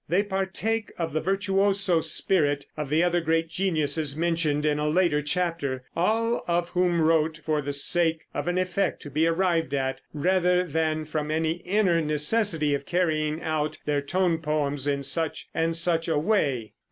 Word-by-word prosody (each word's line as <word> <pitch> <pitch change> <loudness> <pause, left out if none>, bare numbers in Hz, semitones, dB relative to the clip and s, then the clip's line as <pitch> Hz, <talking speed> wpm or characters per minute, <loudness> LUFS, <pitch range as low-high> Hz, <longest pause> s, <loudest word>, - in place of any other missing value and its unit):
They 180 +5 +2
partake 205 +3 -2
of 165 -3 -3
the 155 - 0
virtuoso 195 -1 +2
spirit 155 -3 +1
of 150 -3 -5
the 155 +3 +2
other 175 0 +1
great 165 0 0
geniuses 160 -5 0
mentioned 160 -3 0
in 150 -1 +1
a 150 0 0
later 165 -2 +2
chapter 150 -4 -2
all 225 +6 +1
of 175 0 0
whom 175 -1 +1
wrote 160 0 +2
for 155 -1 0
the 145 0 -4
sake 160 +3 +2
of - - -4
an 175 +1 0
effect 185 +2 -1
to 145 - -9
be 155 +4 +2
arrived 165 -3 0
at, 135 -1 -2
rather 180 +3 +2
than 155 -1 -1
from 150 -1 -3
any 160 +1 0
inner 180 -1 +1
necessity 155 +1 +1
of 140 0 -3
carrying 155 -3 0
out 155 -1 -2
their 145 -1 0
tone 170 +3 0
poems 145 -3 -1
in 140 -1 -1
such 160 +3 -1
and 165 0 0
such 165 0 +1
a 160 -2 +1
way. 145 - 0
165 Hz, 170 wpm, -25 LUFS, 150-180 Hz, -, They